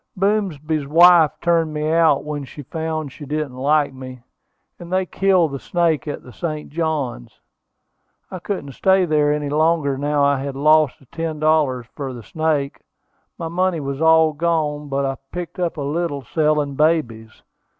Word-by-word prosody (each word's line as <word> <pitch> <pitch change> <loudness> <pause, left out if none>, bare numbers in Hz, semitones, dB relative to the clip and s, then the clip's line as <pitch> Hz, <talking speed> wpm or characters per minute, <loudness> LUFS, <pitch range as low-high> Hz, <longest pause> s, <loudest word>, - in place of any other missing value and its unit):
Boomsby's 165 -7 -1
wife 170 +1 +7
turned 165 -3 +1
me 150 +1 -1
out 160 -4 +3
when 150 -1 -4
she 145 +2 -10
found 160 0 -4
she 150 - -11
didn't 145 -2 -3
like 145 +2 +1
me, 130 -1 -10 0.6
and 175 0 -10
they 185 0 +1
killed 185 -4 +2
the 140 - -5
snake 165 -4 0
at 145 - -5
the 125 - -13
St. 155 0 -5
Johns. 150 - -3 0.9
I 185 - -6
couldn't 175 -6 -5
stay 190 +6 +2
there 150 -2 +2
any 150 -1 -2
longer 150 -2 +1
now 145 0 +1
I 140 -1 +2
had 135 0 -5
lost 155 0 +3
the 135 - -22
ten 160 +3 -5
dollars 150 -6 +1
for 135 -3 -5
the 120 -2 -9
snake. 145 +4 -2 0.6
My 165 - -4
money 180 0 0
was 140 0 -4
all 160 -1 +5
gone; 150 -2 -1
but 140 0 -1
I 135 0 -2
picked 180 +1 -6
up 175 -2 -2
a - - -3
little 145 0 -2
selling 150 0 0
babies." 130 -8 -1
155 Hz, 170 wpm, -20 LUFS, 140-165 Hz, 0.9 s, wife